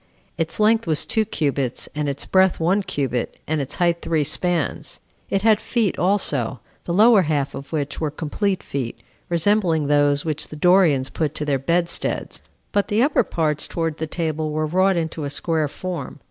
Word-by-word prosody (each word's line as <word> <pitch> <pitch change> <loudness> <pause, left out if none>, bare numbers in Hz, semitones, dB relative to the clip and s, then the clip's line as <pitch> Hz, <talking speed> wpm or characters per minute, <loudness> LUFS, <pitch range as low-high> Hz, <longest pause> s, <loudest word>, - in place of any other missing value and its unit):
Its 165 +2 -3
length 220 -1 +3
was 155 -3 +2
two 220 -1 +1
cubits, 140 - -2
and 150 -1 -2
its 140 - -3
breadth 190 -1 +3
one 180 +5 +2
cubit, 130 -9 -3
and 155 -1 -1
its 135 - -4
height 170 -1 +1
three 160 -2 0
spans. 165 +1 0 0.3
It 195 0 0
had 220 -1 +4
feet 225 -6 0
also, 145 - +1 0.3
the - - -3
lower 215 0 +6
half 145 -4 -1
of 140 - -8
which 145 -2 -3
were 155 - 0
complete 180 +6 -2
feet, 130 -4 -4 0.3
resembling 170 -2 +2
those 145 0 +2
which 155 -2 -1
the - - -9
Dorians 155 -5 +3
put 155 -3 -2
to 150 - -2
their 140 -2 0
bedsteads; 170 +5 -1 0.3
but 205 -1 +1
the 215 +3 +2
upper 290 +2 +3
parts 155 -3 -1
towards 165 -2 -3
the 160 - -2
table 155 -1 -2
were 155 +1 -1
wrought 185 +4 +2
into 160 -1 -3
a 140 - -3
square 155 +1 0
form. 180 0 -6
160 Hz, 180 wpm, -22 LUFS, 145-185 Hz, 0.3 s, lower